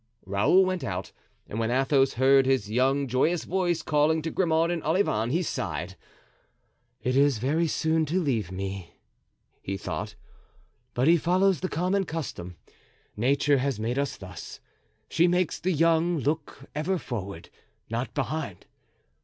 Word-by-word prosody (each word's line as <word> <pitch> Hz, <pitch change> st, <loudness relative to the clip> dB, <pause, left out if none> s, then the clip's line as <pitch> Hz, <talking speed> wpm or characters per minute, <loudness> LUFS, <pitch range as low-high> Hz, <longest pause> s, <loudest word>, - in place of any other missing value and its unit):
Raoul 100 Hz, -, +4 dB
went 185 Hz, -1 st, -2 dB
out, 90 Hz, 0 st, -4 dB, 0.4 s
and 110 Hz, -, -5 dB
when 115 Hz, 0 st, 0 dB
Athos 135 Hz, +1 st, +2 dB
heard 135 Hz, +2 st, +4 dB
his 130 Hz, -6 st, +1 dB
young, 135 Hz, +4 st, +2 dB
joyous 150 Hz, +7 st, +1 dB
voice 175 Hz, -2 st, 0 dB
calling 155 Hz, +1 st, +2 dB
to 165 Hz, -, -3 dB
Grimaud 165 Hz, -2 st, +2 dB
and 170 Hz, -2 st, -2 dB
Olivain, 155 Hz, -, +1 dB
he 170 Hz, +7 st, +1 dB
sighed. 90 Hz, -, -4 dB, 1.1 s
"It 125 Hz, +1 st, 0 dB
is 140 Hz, -2 st, +4 dB
very 150 Hz, +9 st, +1 dB
soon 160 Hz, +1 st, +1 dB
to 175 Hz, +6 st, +1 dB
leave 115 Hz, -, -1 dB
me," 95 Hz, -2 st, -6 dB, 0.7 s
he 95 Hz, 0 st, -4 dB
thought, -, -, -5 dB, 0.8 s
"but 125 Hz, +4 st, +2 dB
he 170 Hz, +1 st, +6 dB
follows 185 Hz, +3 st, +2 dB
the 185 Hz, -, -3 dB
common 185 Hz, +4 st, 0 dB
custom. 140 Hz, -, -5 dB, 0.6 s
Nature 140 Hz, +5 st, +2 dB
has 130 Hz, -4 st, -1 dB
made 120 Hz, +5 st, -1 dB
us 140 Hz, -, -2 dB
thus; 95 Hz, -4 st, -9 dB, 0.5 s
she 170 Hz, +8 st, +3 dB
makes 180 Hz, -1 st, +1 dB
the 185 Hz, -, 0 dB
young 165 Hz, +1 st, +2 dB
look 145 Hz, -1 st, -3 dB
ever 160 Hz, +6 st, -1 dB
forward, 100 Hz, -, -6 dB, 0.4 s
not 115 Hz, +3 st, -3 dB
behind. 140 Hz, -, -3 dB
140 Hz, 145 wpm, -27 LUFS, 115-165 Hz, 1.1 s, he